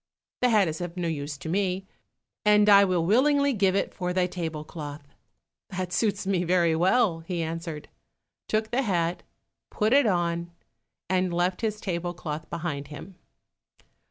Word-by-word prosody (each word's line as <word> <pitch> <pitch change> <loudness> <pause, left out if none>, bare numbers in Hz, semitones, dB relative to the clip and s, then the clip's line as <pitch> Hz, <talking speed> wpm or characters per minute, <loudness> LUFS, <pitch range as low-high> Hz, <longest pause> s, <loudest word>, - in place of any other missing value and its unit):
The 250 - +4
hat 210 -5 +4
is 160 +2 -4
of 175 0 -5
no 175 -1 -1
use 145 -2 -4
to 140 - -9
me, 190 +2 -1 0.6
and 210 0 +5
I 200 -1 +8
will 180 -4 +1
willingly 280 - +3
give 195 -4 +2
it 200 - -1
for 180 -1 -3
thy 180 0 +2
table 165 -4 -4
cloth." 145 -2 -8 0.6
"That 185 -1 -4
suits 205 -3 0
me 190 -2 +1
very 170 -2 +2
well," 185 +1 +3
he 170 0 -3
answered, 165 -1 -5 0.6
took 220 0 -1
the 250 +3 +2
hat, 175 -7 0 0.5
put 215 +3 +1
it 280 -3 +5
on, 170 -2 0 0.6
and 185 0 +1
left 175 +3 0
his 215 -2 -1
table 175 -3 -3
cloth 155 -2 -6
behind 155 -4 -4
him. 150 +6 -10
180 Hz, 160 wpm, -26 LUFS, 165-200 Hz, 0.6 s, I